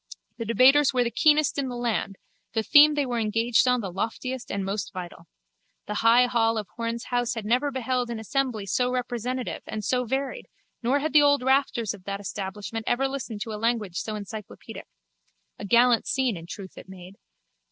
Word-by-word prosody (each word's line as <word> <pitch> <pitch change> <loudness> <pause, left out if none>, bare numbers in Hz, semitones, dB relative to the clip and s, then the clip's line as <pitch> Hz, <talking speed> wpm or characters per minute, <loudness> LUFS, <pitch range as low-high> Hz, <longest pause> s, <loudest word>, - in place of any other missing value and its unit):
The 230 - -3
debaters 260 +5 +5
were 250 - +3
the 235 - -2
keenest 305 0 +3
in 270 -2 -2
the 245 - -5
land, 235 -4 -2 0.4
the 225 -1 0
theme 300 +4 +7
they 290 -1 +1
were 240 -2 -2
engaged 225 +3 +2
on 250 -1 +3
the 195 -4 -5
loftiest 235 +6 -4
and 195 -1 -3
most 195 -2 -3
vital. 180 -2 -8 0.6
The 210 - -4
high 235 +2 +6
hall 225 -2 +1
of 210 -2 -4
Horne's 230 0 -3
house 245 -1 0
had 225 -2 -5
never 250 +6 +1
beheld 255 -2 -2
an 235 - -4
assembly 240 -2 -2
so 245 +6 0
representative 250 0 -3
and 215 -2 -5
so 250 -1 0
varied 270 - -3 0.3
nor 260 +4 +1
had 310 -1 -2
the 300 - +7
old 285 -2 +3
rafters 265 -5 +1
of 190 -3 -14
that 200 0 -4
establishment 205 +3 -5
ever 270 +3 +1
listened 255 -6 -6
to 220 -1 -4
a 210 - -6
language 225 -6 -1
so 215 - -4
encyclopaedic. 210 0 -9 0.7
A - - -6
gallant 235 +3 +4
scene 260 -5 0
in 165 -1 -9
truth 190 0 -9
it - - -14
made. 190 +1 -12
235 Hz, 195 wpm, -26 LUFS, 210-255 Hz, 0.7 s, theme